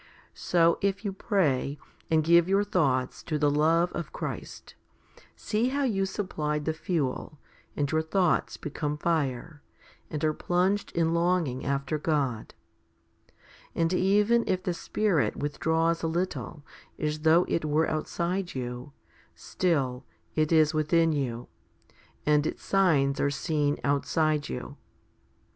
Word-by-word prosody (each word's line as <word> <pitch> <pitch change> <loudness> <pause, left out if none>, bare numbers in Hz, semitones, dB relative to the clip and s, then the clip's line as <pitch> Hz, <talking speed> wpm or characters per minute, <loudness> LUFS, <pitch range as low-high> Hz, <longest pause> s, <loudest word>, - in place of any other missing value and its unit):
So 170 -1 +2
if 200 +2 -1
you 200 - -1
pray, 150 - 0 0.3
and 160 -1 +3
give 170 +2 +5
your 195 +1 +3
thoughts 130 -10 0
to 155 - -2
the 145 -1 +2
love 165 +4 +3
of 170 - -5
Christ, - - -7 0.6
see 220 +3 -1
how 280 +2 -1
you 195 -7 0
supplied 150 -7 -3
the 160 - 0
fuel, 155 -3 -3 0.4
and 145 -1 0
your 160 0 +2
thoughts 175 +2 +1
become 150 0 -4
fire, 150 -2 -2 0.5
and 150 -1 -4
are 155 - +2
plunged 185 +5 0
in 165 -1 +1
longing 170 -6 +1
after 140 +2 -1
God; 140 -8 -1 1.2
and 165 +1 +1
even 205 +5 +3
if 185 0 0
the 180 - -1
Spirit 185 -2 0
withdraws 160 +3 0
a 165 - -1
little, 165 -3 -3 0.3
as 150 0 -2
though 160 +3 +4
It 165 - -1
were 155 +1 +1
outside 170 +3 -2
you, 125 +2 -5 0.4
still 135 -8 -1 0.3
It 155 0 +1
is 155 -1 +4
within 165 +2 +2
you, 125 -5 -3 0.8
and 150 0 +3
Its - - -6
signs 150 -8 +2
are 145 - +2
seen 145 0 0
outside 150 +2 +1
you. 65 - -6
160 Hz, 135 wpm, -27 LUFS, 145-180 Hz, 1.2 s, give